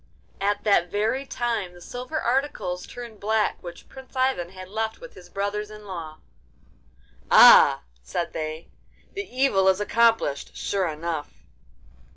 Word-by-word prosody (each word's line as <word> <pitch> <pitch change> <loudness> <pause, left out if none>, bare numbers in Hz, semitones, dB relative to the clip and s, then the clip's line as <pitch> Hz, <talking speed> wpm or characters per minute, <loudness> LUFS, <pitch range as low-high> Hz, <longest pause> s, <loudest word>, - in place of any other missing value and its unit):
At 205 +1 0
that 200 -4 +3
very 225 +8 -1
time 230 -8 -2
the - - -13
silver 250 - -5
articles 240 -8 -1
turned 235 -3 -9
black 215 +1 0
which 175 -1 -10
Prince 265 0 -14
Ivan 255 -10 0
had 185 0 -10
left 220 +3 -3
with - - -11
his 175 - -14
brothers 205 +2 -3
in 210 0 -12
law. 165 -5 -7 1.1
'Ah!' - - +8 0.2
said 115 - -4
they, 155 0 -5 0.4
'the 395 - -3
evil 250 -8 +2
is 190 0 +4
accomplished 225 -9 +1
sure 195 -2 -1
enough! 160 -1 -5
205 Hz, 140 wpm, -25 LUFS, 175-235 Hz, 1.1 s, Ah